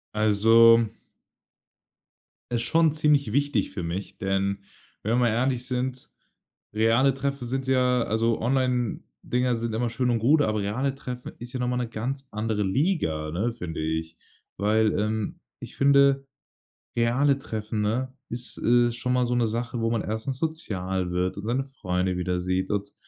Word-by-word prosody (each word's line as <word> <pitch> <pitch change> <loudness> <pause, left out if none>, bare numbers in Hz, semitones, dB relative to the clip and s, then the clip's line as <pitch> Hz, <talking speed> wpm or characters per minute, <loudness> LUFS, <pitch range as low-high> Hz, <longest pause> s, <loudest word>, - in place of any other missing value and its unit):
Also 115 +2 +6 1.6
ist 120 -1 0
schon 160 +5 +3
ziemlich 150 -6 +2
wichtig 145 +1 +1
für 90 - -5
mich, 90 +4 -5
denn 100 +1 -1 0.4
wenn 110 +3 0
wir - - +4
mal 120 -2 +3
ehrlich 125 +2 0
sind, 130 0 -3 0.6
reale 115 +5 +3
Treffen 140 -1 -3
sind 130 +2 -2
ja 125 -2 +3
also 115 +1 0
Onlinedinger 125 0 -1
sind 115 -1 -3
immer 120 0 0
schön 125 +2 0
und 115 - +2
gut, 145 +7 +4
aber 110 -4 0
reale 130 +7 -1
Treffen 125 -2 -7
ist 120 +1 -9
ja 130 - -4
noch 125 - 0
mal 125 - 0
'ne 125 -1 -1
ganz 130 +5 -4
andere 105 -1 -1
Liga, 95 - 0
ne, 105 +9 -1
finde 90 -9 -5
ich. 80 +1 -3 0.4
Weil, 110 +2 +2
ähm, 110 0 -2 0.2
ich - - -10
finde, 140 0 +4 0.7
reale 125 +4 +3
Treffen, 110 -4 -4
ne, 125 +5 -1 0.2
ist, 120 +1 -5
äh, 120 0 +3
schon 125 +1 -3
mal 125 0 +2
so 120 0 0
'ne 120 -2 +2
Sache, 115 +1 -3
wo 115 - +1
man 115 -2 0
erstens 110 +5 -3
sozial 95 - -2
wird, 90 +1 -1
und 100 - -6
seine 125 +5 -1
Freunde 90 -8 -2
wieder 90 0 -1
sieht 95 +2 -1
und 100 -1 -2
115 Hz, 165 wpm, -26 LUFS, 105-130 Hz, 1.6 s, Also